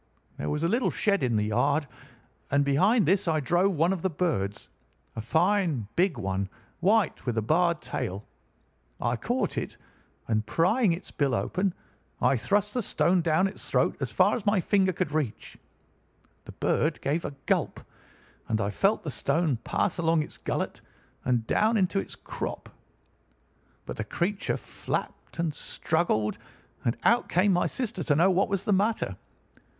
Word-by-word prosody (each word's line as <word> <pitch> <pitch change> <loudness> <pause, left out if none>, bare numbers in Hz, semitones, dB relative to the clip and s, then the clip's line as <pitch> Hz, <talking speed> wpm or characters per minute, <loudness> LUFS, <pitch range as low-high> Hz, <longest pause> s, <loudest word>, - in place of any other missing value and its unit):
There 75 - -3
was 150 - -1
a - - +3
little 235 +7 +1
shed 200 -2 +1
in 120 -3 +1
the 105 0 +1
yard, 140 +8 +1 0.6
and 140 +1 +2
behind 190 - +3
this 185 +4 +2
I 160 -2 +2
drove 175 +6 +2
one 170 +5 +3
of 185 - -4
the 190 - +1
birds—a 120 - -4
fine 165 - +1
big 180 -5 +2
one, 95 -2 -2 0.3
white, 200 +1 +2
with 120 -2 -1
a - - +3
barred 170 +5 +2
tail. 95 +3 -4 0.7
I - - 0
caught - - -1
it, - - -7 0.5
and 110 -1 +1
prying 185 - +2
its 175 +3 -7
bill 140 -3 +1
open, 180 - -1 0.4
I - - +3
thrust 205 - 0
the 250 - 0
stone 185 -3 +2
down 165 +2 +2
its 195 - -7
throat - - +2
as - - -2
far - - +4
as 240 - -4
my 205 -1 +3
finger 190 +1 +2
could 180 -3 -2
reach. 145 -8 -3 0.9
The - - -10
bird - - 0
gave 155 +5 0
a 140 - -5
gulp, - - 0 0.7
and 110 - 0
I 100 -2 0
felt 195 - +1
the 155 - -3
stone 145 0 +1
pass 115 - -1
along 165 -1 +2
its - - -10
gullet - - -3 0.4
and 120 -3 +1
down 220 - +2
into 195 0 +2
its - - -6
crop. - - -6 1.2
But - - -6
the - - -2
creature 195 +4 -1
flapped - - -5
and 165 -2 -1
struggled, 145 -10 -1 0.5
and 115 - +1
out 235 +2 +3
came 190 +3 +3
my 175 - +2
sister 230 -8 -3
to 145 - +3
know 175 +6 +4
what 185 +2 +2
was 195 -2 -1
the 210 - +2
matter. 195 - +1
170 Hz, 165 wpm, -27 LUFS, 135-195 Hz, 1.2 s, far